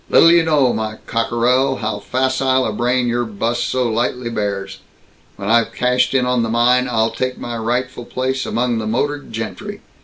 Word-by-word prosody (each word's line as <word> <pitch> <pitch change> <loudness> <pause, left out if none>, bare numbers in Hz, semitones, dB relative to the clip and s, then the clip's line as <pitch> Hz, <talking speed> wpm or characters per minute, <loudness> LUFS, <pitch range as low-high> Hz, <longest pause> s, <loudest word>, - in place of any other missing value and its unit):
Little 165 - +7
you 170 0 +6
know, 150 -6 +3
my 110 -1 -3
cockerel, 125 +3 +1
how 110 -3 -3
facile 130 +2 +1
a 110 - -2
brain 125 +3 +1
your 120 0 0
'bus 115 +2 -2
so 130 -1 0
lightly 120 +1 -1
bears. 100 -3 -3 0.6
When 100 - -6
I've 115 +1 +2
cashed 125 +1 +1
in 125 -2 +3
on 125 -1 +1
the 115 - -1
mine, 125 +2 +3
I'll 115 -1 +1
take 130 0 -3
my 120 0 -5
rightful 120 +2 -2
place 130 +1 -2
among 120 -1 0
the 110 - -3
motored 145 +6 -2
gentry. 200 - -6
120 Hz, 180 wpm, -19 LUFS, 115-130 Hz, 0.6 s, Little